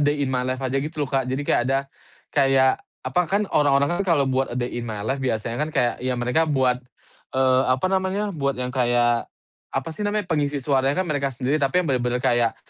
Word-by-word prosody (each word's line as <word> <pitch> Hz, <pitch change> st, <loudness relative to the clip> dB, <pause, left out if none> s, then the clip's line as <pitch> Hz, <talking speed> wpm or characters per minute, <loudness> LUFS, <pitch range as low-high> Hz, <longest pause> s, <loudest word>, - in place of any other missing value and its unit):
day 145 Hz, 0 st, +1 dB
in 130 Hz, -, -2 dB
my 125 Hz, 0 st, 0 dB
life" 130 Hz, +1 st, -2 dB
aja 135 Hz, +1 st, 0 dB
gitu 150 Hz, +1 st, -3 dB
loh, -, -, -13 dB
Kak, 135 Hz, -2 st, +1 dB
jadi 135 Hz, +3 st, -2 dB
kayak -, -, +2 dB
ada 135 Hz, 0 st, +3 dB, 0.5 s
kayak 135 Hz, -2 st, +3 dB, 0.2 s
apa 130 Hz, +7 st, +1 dB
kan, 200 Hz, +2 st, +2 dB
orang-orang 145 Hz, +3 st, +3 dB
kan 180 Hz, -4 st, +2 dB
kalau 140 Hz, -, +3 dB
buat 130 Hz, +1 st, +1 dB
"a 120 Hz, -, -4 dB
day 120 Hz, 0 st, -2 dB
in 120 Hz, -, -4 dB
my 105 Hz, -2 st, -5 dB
life" 135 Hz, +4 st, -1 dB
biasanya 115 Hz, 0 st, -2 dB
kan 155 Hz, -, 0 dB
kayak 120 Hz, -5 st, +1 dB
ya 125 Hz, 0 st, -1 dB
mereka 125 Hz, +7 st, +1 dB
buat, 130 Hz, -4 st, +2 dB, 0.6 s
eee, 130 Hz, 0 st, +4 dB
apa 130 Hz, +7 st, +2 dB
namanya, 190 Hz, +2 st, 0 dB
buat 140 Hz, -4 st, -1 dB
yang 125 Hz, 0 st, -3 dB
kayak, 120 Hz, -2 st, +2 dB, 0.4 s
apa -, -, -3 dB
sih 210 Hz, -, -6 dB
namanya, 210 Hz, -1 st, 0 dB
pengisi 150 Hz, -4 st, 0 dB
suaranya 135 Hz, +1 st, +1 dB
kan -, -, -8 dB
mereka 145 Hz, -3 st, 0 dB
sendiri, 135 Hz, +4 st, -1 dB
tapi 140 Hz, +7 st, +2 dB
yang -, -, -5 dB
bener-bener 125 Hz, -1 st, 0 dB
kayak, 120 Hz, -2 st, +2 dB
135 Hz, 220 wpm, -23 LUFS, 125-150 Hz, 0.6 s, eee